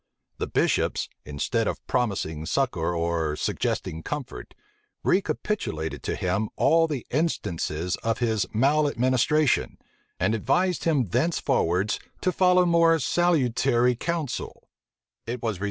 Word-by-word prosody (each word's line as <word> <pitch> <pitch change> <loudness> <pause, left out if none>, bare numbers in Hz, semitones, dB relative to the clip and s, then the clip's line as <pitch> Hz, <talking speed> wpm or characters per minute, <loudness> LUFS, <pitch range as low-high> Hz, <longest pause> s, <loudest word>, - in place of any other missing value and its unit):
The - - -2
bishops, - - 0 0.2
instead 105 - -1
of - - -4
promising 95 -10 -1
succor 85 -10 0
or 85 -2 -1
suggesting 80 +1 -2
comfort, 150 - -6 0.5
recapitulated 185 - -1
to - - -2
him 95 +4 -1
all 165 0 +4
the 145 -6 -4
instances 90 - -1
of 115 +1 -1
his 110 -5 0
maleadministration, 140 +2 +2 0.4
and - - +2
advised 180 - +1
him 150 -7 +2
thenceforwards 100 - +1 0.2
to 185 - +1
follow 180 0 +4
more 170 -1 +4
salutary 125 -6 +2
counsel. 160 0 -4
125 Hz, 105 wpm, -25 LUFS, -, 0.5 s, all